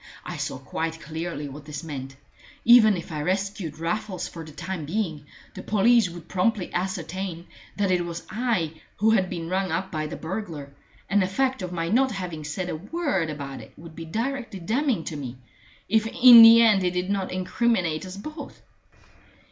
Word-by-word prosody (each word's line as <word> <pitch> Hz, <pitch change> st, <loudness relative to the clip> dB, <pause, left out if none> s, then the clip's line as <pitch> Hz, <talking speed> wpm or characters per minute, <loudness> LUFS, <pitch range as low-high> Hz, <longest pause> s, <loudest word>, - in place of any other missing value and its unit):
I -, -, -5 dB
saw -, -, -3 dB
quite 165 Hz, 0 st, -4 dB
clearly 160 Hz, -1 st, -5 dB
what 145 Hz, +1 st, -10 dB
this 150 Hz, 0 st, -7 dB
meant. 135 Hz, -4 st, -7 dB, 0.5 s
Even 220 Hz, -4 st, +7 dB
if 170 Hz, -, -8 dB
I 150 Hz, -1 st, -3 dB
rescued 190 Hz, -2 st, -2 dB
Raffles 180 Hz, +2 st, -3 dB
for 165 Hz, -, -8 dB
the 155 Hz, -, -11 dB
time 170 Hz, +2 st, -5 dB
being, 160 Hz, -5 st, -3 dB, 0.3 s
the -, -, -8 dB
police 220 Hz, 0 st, +3 dB
would 170 Hz, -1 st, -10 dB
promptly 190 Hz, 0 st, 0 dB
ascertain 180 Hz, -1 st, -3 dB, 0.3 s
that 200 Hz, -2 st, +1 dB
it 180 Hz, -1 st, +2 dB
was 170 Hz, 0 st, -6 dB
I 195 Hz, -10 st, -1 dB, 0.2 s
who 220 Hz, +2 st, +3 dB
had 190 Hz, -5 st, +2 dB
been 165 Hz, -1 st, -5 dB
rung 190 Hz, 0 st, -1 dB
up 185 Hz, +4 st, -2 dB
by 155 Hz, -1 st, -2 dB
the -, -, -6 dB
burglar, 160 Hz, -6 st, -6 dB, 0.3 s
and 200 Hz, +2 st, +3 dB
the 185 Hz, -, +1 dB
fact 260 Hz, +5 st, 0 dB
of 180 Hz, -1 st, -4 dB
my 165 Hz, -2 st, -2 dB
not 260 Hz, +5 st, +3 dB
having 175 Hz, -5 st, -5 dB
said 155 Hz, +5 st, -4 dB
a -, -, -2 dB
word 195 Hz, -, -2 dB
about 140 Hz, -3 st, -6 dB
it -, -, -14 dB
would 160 Hz, 0 st, -12 dB
be 165 Hz, -, -7 dB
directly 230 Hz, +3 st, -3 dB
damning 225 Hz, -, 0 dB
to 160 Hz, -, -5 dB
me, 130 Hz, -4 st, -6 dB, 0.5 s
if 220 Hz, +1 st, +2 dB
in 240 Hz, 0 st, +9 dB
the 230 Hz, +1 st, +10 dB
end 210 Hz, -4 st, +4 dB
it 180 Hz, 0 st, 0 dB
did 180 Hz, +2 st, -1 dB
not 195 Hz, -2 st, -1 dB
incriminate 185 Hz, -3 st, 0 dB
us 185 Hz, +1 st, -8 dB
both. 295 Hz, +7 st, -8 dB
185 Hz, 190 wpm, -25 LUFS, 160-215 Hz, 0.5 s, the